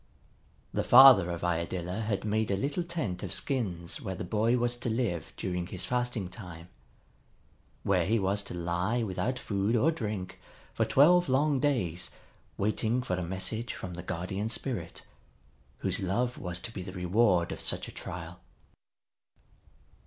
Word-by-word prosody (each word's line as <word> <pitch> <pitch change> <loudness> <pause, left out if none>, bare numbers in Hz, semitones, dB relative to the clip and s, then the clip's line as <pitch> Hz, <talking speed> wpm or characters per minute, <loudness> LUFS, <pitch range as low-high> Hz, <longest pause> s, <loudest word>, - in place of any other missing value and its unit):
The - - 0
father 125 -8 +9
of 85 -1 -4
Iadilla 90 +3 -2
had 105 -2 -2
made 110 +1 0
a 100 - +1
little 145 - -1
tent 155 - -3
of - - -5
skins 90 -11 -2
where 95 - -4
the - - -5
boy 110 +6 +1
was 120 0 +1
to 120 - -3
live 100 -9 -1
during 90 -2 -3
his 95 -1 -3
fasting 120 -4 -1
time; 90 -2 -10 1.1
where 90 -3 +2
he 115 +3 +3
was 100 0 +1
to 90 - -5
lie 90 +7 0
without 110 +5 -2
food 105 -1 0
or 135 +8 +4
drink 105 - -4 0.3
for - - +1
twelve 175 +4 +5
long 140 +1 +3
days, 110 - 0 0.5
waiting 110 +4 0
for 90 - -3
a 90 - -3
message 95 +7 -3
from 90 - -6
the 85 - -6
Guardian 95 +4 -3
Spirit 115 -9 -3 0.8
whose - - +1
love 120 +7 0
was 90 -1 -3
to 115 - -5
be 100 - -6
the 90 0 -7
reward 90 -1 +2
of - - -5
such - - 0
a - - -8
trial. - - -7
100 Hz, 160 wpm, -30 LUFS, 90-120 Hz, 1.1 s, father